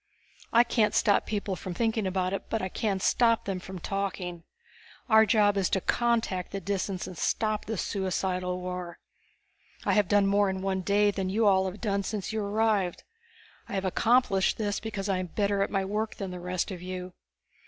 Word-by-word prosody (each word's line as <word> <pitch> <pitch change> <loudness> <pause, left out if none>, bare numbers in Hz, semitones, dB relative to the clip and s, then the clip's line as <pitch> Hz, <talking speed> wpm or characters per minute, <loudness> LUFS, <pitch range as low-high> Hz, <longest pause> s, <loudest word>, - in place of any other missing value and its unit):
"I 235 +1 +6
can't 230 -3 +1
stop 205 -2 +3
people 205 -2 -2
from 180 -1 -6
thinking 225 -2 0
about 185 0 -1
it 195 - -4
but 225 - 0
I 190 - -3
can 200 0 -1
stop 230 +3 +3
them 195 -2 -2
from 185 +1 -8
talking. 180 -2 -3 0.7
Our 220 -2 +6
job 205 -1 +4
is 190 -2 +1
to 190 - +1
contact 225 -4 0
the 195 - -3
Disans 195 -1 -2
and 185 - -8
stop 215 +5 0
this 220 -4 -2
suicidal 185 -1 -1
war. 180 -1 -5 0.9
I - - +2
have 210 -3 +3
done 205 0 +4
more 200 0 +3
in 190 0 -3
one 190 -1 0
day 205 +2 +3
than 190 -2 -2
you 220 +3 +1
all 190 -2 +4
have 185 - -10
done 200 -3 0
since 205 +1 -4
you 220 - -1
arrived. 205 -3 0 0.7
I - - -6
have 195 -1 -1
accomplished 200 0 +2
this 205 -2 -1
because 210 -3 -4
I 190 -2 +1
am 185 - -3
better 200 +2 0
at 195 - +1
my 195 -1 0
work 215 +3 -2
than 195 -2 -5
the 180 - -6
rest 180 +2 -2
of 180 -2 -6
you. 185 0 -6
195 Hz, 195 wpm, -28 LUFS, 185-210 Hz, 0.9 s, I